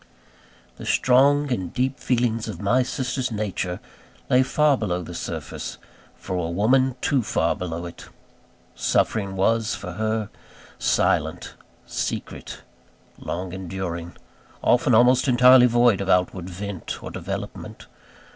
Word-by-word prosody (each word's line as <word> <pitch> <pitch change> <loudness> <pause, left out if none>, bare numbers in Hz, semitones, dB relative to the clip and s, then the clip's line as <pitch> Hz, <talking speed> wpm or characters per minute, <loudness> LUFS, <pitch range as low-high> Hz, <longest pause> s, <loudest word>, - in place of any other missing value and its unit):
The - - -9
strong 140 +3 +3
and 95 -6 -3
deep 130 +2 -1
feelings 115 -3 0
of 110 - -6
my 105 +6 +2
sister's 125 0 -2
nature 100 -4 -3 0.5
lay 125 - +6
far 150 +2 +3
below 90 -7 -2
the - - -8
surface - - -6 0.4
for 95 - -5
a 85 -2 -2
woman, 125 +8 +2
too 135 -3 +2
far 85 -6 0
below 90 -3 -5
it. 85 - -10 0.7
Suffering 100 -3 0
was, 115 +3 +1
for 90 - -7
her, 110 +2 -2 0.5
silent, - - 0 0.3
secret, - - -5 0.6
long 90 +1 -5
enduring; 90 -2 -5 0.5
often 125 -1 +4
almost 125 +3 +5
entirely 125 0 +7
void 120 -4 +3
of 100 - -3
outward 90 0 +1
vent 95 0 -6
or - - -6
development. - - -6
110 Hz, 125 wpm, -23 LUFS, 90-125 Hz, 0.7 s, entirely